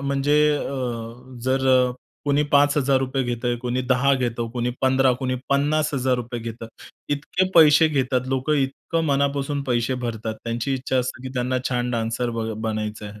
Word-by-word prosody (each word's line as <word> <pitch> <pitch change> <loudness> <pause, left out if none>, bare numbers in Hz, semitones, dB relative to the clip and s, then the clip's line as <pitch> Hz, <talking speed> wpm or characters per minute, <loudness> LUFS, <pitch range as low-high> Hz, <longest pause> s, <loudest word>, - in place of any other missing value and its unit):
म्हणजे 140 +1 +1 0.2
अ, 125 -2 -5
जर 130 +1 +1
अ, 125 -1 +4 0.3
कोणी 145 0 +2
₹5,000 140 -2 +3
घेतंय, 120 0 -2
कोणी 125 +1 -1
10 130 +2 +2
घेतं, 120 -2 -2
कोणी 120 0 -2
15 130 0 +3
घेतं, 125 - 0
कोणी 130 -1 -1
₹50,000 135 -4 0
घेतं, 115 0 -7 0.5
इतके 180 +6 -1
पैसे 160 -1 +7
घेतात. 130 -3 0
लोकं 135 +3 0
इतकं 140 +4 -1
मनापासून 140 0 0
पैसे 125 0 0
भरतात. 110 -1 -3
त्यांची 120 +3 -2
इच्छा 130 0 -2
असते, 125 0 -3
की 130 - -6
त्यांना 130 +1 0
छान 125 -1 -1
डान्सर 115 +1 -1
ब 115 -1 -3
बनायचं 110 -1 -3
आहे. 105 +1 -11
130 Hz, 155 wpm, -23 LUFS, 120-140 Hz, 0.5 s, पैसे